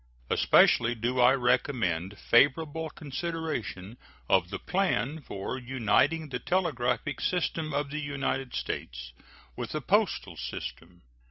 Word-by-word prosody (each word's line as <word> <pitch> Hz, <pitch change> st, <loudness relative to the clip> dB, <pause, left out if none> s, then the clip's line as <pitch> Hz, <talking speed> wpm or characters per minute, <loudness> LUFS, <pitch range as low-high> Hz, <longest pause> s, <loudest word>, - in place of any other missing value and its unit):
Especially 120 Hz, +1 st, +4 dB
do 120 Hz, +3 st, -1 dB
I 125 Hz, +1 st, +7 dB
recommend 110 Hz, -, 0 dB
favorable 155 Hz, +7 st, +2 dB
consideration 145 Hz, -, -5 dB, 0.3 s
of 95 Hz, -2 st, +3 dB
the -, -, -4 dB
plan 160 Hz, -6 st, -1 dB
for 115 Hz, +1 st, -5 dB
uniting 135 Hz, +5 st, +1 dB
the 125 Hz, -2 st, -3 dB
telegraphic 140 Hz, -4 st, -1 dB
system 160 Hz, -3 st, -1 dB
of 140 Hz, 0 st, -2 dB
the 150 Hz, -, -3 dB
United 135 Hz, -2 st, -2 dB
States -, -, -5 dB, 0.4 s
with -, -, -5 dB
the -, -, -2 dB
postal -, -, +1 dB
system. 85 Hz, +8 st, -7 dB
130 Hz, 115 wpm, -28 LUFS, 110-155 Hz, 0.4 s, I